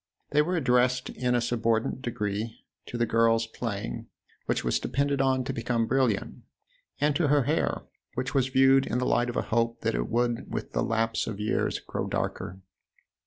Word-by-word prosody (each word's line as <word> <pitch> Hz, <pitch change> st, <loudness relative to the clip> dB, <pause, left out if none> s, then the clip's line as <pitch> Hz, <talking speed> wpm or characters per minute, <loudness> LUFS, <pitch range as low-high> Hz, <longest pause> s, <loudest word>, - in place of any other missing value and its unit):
They 150 Hz, -, +5 dB
were 180 Hz, +4 st, 0 dB
addressed 125 Hz, -4 st, +2 dB
in 125 Hz, -1 st, 0 dB
a 120 Hz, -, +2 dB
subordinate 115 Hz, +1 st, 0 dB
degree 110 Hz, -1 st, -3 dB, 0.2 s
to 120 Hz, -, -5 dB
the 120 Hz, -, +2 dB
girl's 115 Hz, 0 st, +3 dB
" -, -, -17 dB
playing," 100 Hz, -, -3 dB, 0.4 s
which -, -, 0 dB
was -, -, +1 dB
depended 140 Hz, 0 st, 0 dB
on 130 Hz, -1 st, +2 dB
to 135 Hz, +1 st, -3 dB
become 115 Hz, -1 st, 0 dB
brilliant, 125 Hz, -5 st, 0 dB, 0.6 s
and 145 Hz, 0 st, +2 dB
to 165 Hz, -2 st, +2 dB
her 145 Hz, -1 st, +4 dB
hair, -, -, 0 dB, 0.3 s
which 125 Hz, +1 st, -2 dB
was 135 Hz, -2 st, +2 dB
viewed 135 Hz, 0 st, +5 dB
in 120 Hz, -, -1 dB
the 125 Hz, -, 0 dB
light 120 Hz, 0 st, +2 dB
of 120 Hz, -, -3 dB
a -, -, +1 dB
hope 115 Hz, 0 st, +1 dB
that -, -, 0 dB
it -, -, -1 dB
would 120 Hz, 0 st, 0 dB
with -, -, -4 dB
the -, -, 0 dB
lapse 115 Hz, 0 st, 0 dB
of 105 Hz, -3 st, -4 dB
years 105 Hz, +1 st, 0 dB
grow -, -, -4 dB
darker. 95 Hz, +2 st, -3 dB
120 Hz, 190 wpm, -28 LUFS, 115-130 Hz, 0.6 s, They